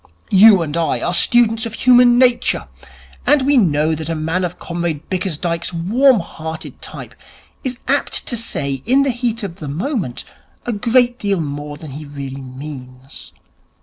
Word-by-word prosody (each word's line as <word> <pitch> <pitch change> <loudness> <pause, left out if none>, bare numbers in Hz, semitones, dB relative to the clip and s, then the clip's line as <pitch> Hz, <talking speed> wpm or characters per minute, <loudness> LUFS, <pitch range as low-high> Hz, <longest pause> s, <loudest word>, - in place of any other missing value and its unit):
You 195 -2 +7
and 150 -1 -5
I 170 -1 0
are 175 - -2
students 230 +4 +3
of 225 - -7
human 245 0 +5
nature, 245 -1 +2 0.6
and 290 -2 +4
we 285 +2 +3
know 160 - +2
that 160 0 -5
a 165 - -1
man 160 +4 -1
of 180 -1 -3
Comrade 170 -3 -4
Bickersdyke's 175 -2 -2
warm 225 +8 +3
hearted 160 -1 -8
type - - -9 0.5
is 255 -2 -3
apt - - 0
to 240 - -2
say 140 - -2
in 270 +3 +4
the 275 - +1
heat 235 -2 -3
of 185 -3 -6
the 155 - -7
moment 180 - -3 0.4
a 240 - -2
great 245 +3 +2
deal 200 -3 0
more 145 -1 -5
than 155 -2 -10
he 150 +3 -8
really 140 -1 -7
means. 130 -1 -10
175 Hz, 165 wpm, -18 LUFS, 150-240 Hz, 0.6 s, You